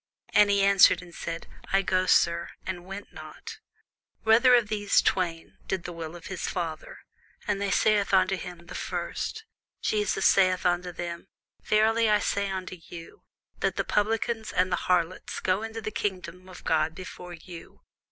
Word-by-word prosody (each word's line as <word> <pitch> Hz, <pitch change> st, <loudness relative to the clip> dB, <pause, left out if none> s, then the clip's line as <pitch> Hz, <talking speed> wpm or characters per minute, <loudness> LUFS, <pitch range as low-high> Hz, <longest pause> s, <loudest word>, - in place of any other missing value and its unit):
And 210 Hz, -1 st, +6 dB
he 200 Hz, -1 st, +3 dB
answered 195 Hz, -2 st, +6 dB
and 175 Hz, -1 st, -14 dB
said, 165 Hz, 0 st, -5 dB, 0.3 s
I 195 Hz, 0 st, +3 dB
go, 185 Hz, 0 st, +1 dB
sir: 170 Hz, 0 st, +3 dB, 0.2 s
and 180 Hz, -1 st, -5 dB
went 195 Hz, +1 st, -8 dB
not. -, -, -10 dB, 0.6 s
Whether 235 Hz, +3 st, +6 dB
of 235 Hz, -3 st, +3 dB
them 205 Hz, -1 st, -3 dB, 0.2 s
twain 170 Hz, -3 st, -1 dB
did 190 Hz, -2 st, -2 dB
the 175 Hz, -, -6 dB
will 165 Hz, 0 st, -7 dB
of 170 Hz, -, -11 dB
his 190 Hz, -2 st, -4 dB
father? 165 Hz, -3 st, -5 dB, 0.5 s
They 200 Hz, -1 st, 0 dB
say 215 Hz, +1 st, +3 dB
unto 195 Hz, -1 st, +2 dB
him, 175 Hz, -2 st, -9 dB
The 180 Hz, -, -10 dB
first. 440 Hz, -, -4 dB, 0.3 s
Jesus 210 Hz, -2 st, 0 dB
saith 185 Hz, -1 st, +4 dB
unto 180 Hz, 0 st, +1 dB
them, 170 Hz, +1 st, -6 dB, 0.3 s
Verily 220 Hz, +1 st, +3 dB
I 210 Hz, -, +5 dB
say 200 Hz, -1 st, -1 dB
unto 185 Hz, -1 st, -5 dB
you, 165 Hz, -1 st, -11 dB, 0.3 s
That -, -, 0 dB
the -, -, 0 dB
publicans 220 Hz, +1 st, 0 dB
and 185 Hz, 0 st, +1 dB
the -, -, +3 dB
harlots 180 Hz, 0 st, 0 dB
go 185 Hz, +2 st, 0 dB
into 225 Hz, 0 st, -5 dB
the 215 Hz, -, -4 dB
kingdom 185 Hz, -2 st, -4 dB
of 185 Hz, -, -12 dB
God 160 Hz, 0 st, +1 dB
before 180 Hz, -1 st, -9 dB
you. 170 Hz, 0 st, -12 dB
185 Hz, 165 wpm, -27 LUFS, 175-205 Hz, 0.6 s, And